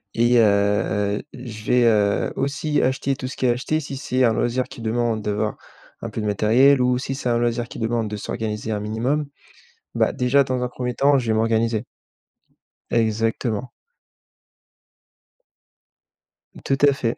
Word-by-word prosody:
et, 120 +1 +4
heu, 100 -1 +2
je 115 -4 -9
vais, 125 0 +3
heu, 105 -3 +2
aussi 145 +2 -1
acheter 130 +1 0
tout 130 - -6
ce 130 - -7
qui 130 - -1
est - - +4
à - - +5
acheter 155 +5 -1
si 140 -2 -6
c'est 130 -1 -1
un 115 -2 +4
loisir 120 +3 0
qui 120 - -11
demande 115 0 -1
d'avoir 105 +1 -2 0.4
un - - -4
peu - - -5
de - - -3
matériel 120 +7 +4
ou 125 0 +2
si 130 +1 -4
c'est 130 -2 -3
un 120 - +2
loisir 120 0 0
qui - - -10
demande 115 0 -1
de 105 - -4
s'organiser 105 +1 -4
un 105 - -1
minimum, 120 +8 -1 0.7
bah, - - +2
déjà 125 +3 +3
dans 130 -1 -2
un 125 - 0
1er 125 0 -4
temps, 140 0 +4
je 125 - -2
vais 110 - +1
m'organiser. 115 0 +1 1.0
Exactement. 115 +1 0 2.9
Tout 135 - +1
à 140 - +4
fait. 120 -3 -2
120 Hz, 170 wpm, -22 LUFS, 110-130 Hz, 2.9 s, à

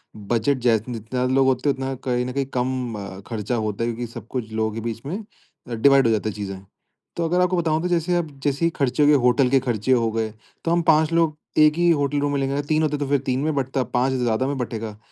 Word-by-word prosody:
Budget 115 +6 0
जै 120 -2 +3
जितने 115 +1 -6
ज़्यादा 125 +3 -2
लोग 135 0 +4
होते 130 +2 +1
हैं - - +3
उतना 135 0 -3
कहीं 125 -1 0
न 125 - -4
कहीं 140 0 -1
कम 120 -7 -3
खर्चा 115 +1 -3
होता 110 -1 -2
है, 115 - 0
क्योंकि 120 +1 -5
सब - - -9
कुछ 115 -4 -5
लोगों 110 0 -1
के 115 - -4
बीच 115 0 -4
में 190 +10 -4 0.6
डिवाइड 135 -2 +6
हो - - +3
जाते 110 0 -1
है 105 - -7
चीजें। 100 -2 -5 0.6
तो 170 - -1
अगर 180 +2 +2
आपको 180 0 +2
बताऊँ 160 -2 +1
तो 180 - -1
जैसे, 175 0 +1
आप 175 -2 0 0.2
जैसे 145 +3 +1
ही - - +4
खर्चे 140 +1 +1
हो 145 - +5
गए, 150 - +6
होटल 125 0 +3
के 135 - +4
खर्चे 120 -2 -1
हो 115 -3 +3
गए, 110 -1 -2 0.3
तो 165 - +1
हम 170 0 +3
5 160 0 +4
लोग 165 -2 +2 0.2
1 150 0 +6
ही 175 0 +3
होटल 145 -2 +1
रूम 145 0 0
में 140 - 0
लेंगे। 135 +1 0
3 155 +1 +2
होते 150 -1 0
तो 145 -1 -3
फिर 140 0 +2
3 130 0 0
में 155 +2 0
बँटता, 135 -1 0
5 125 +2 0
है - - 0
ज़्यादा 120 +2 +1
में 140 0 -2
बँटेगा। 110 -4 -4
130 Hz, 260 wpm, -23 LUFS, 115-145 Hz, 0.6 s, डिवाइड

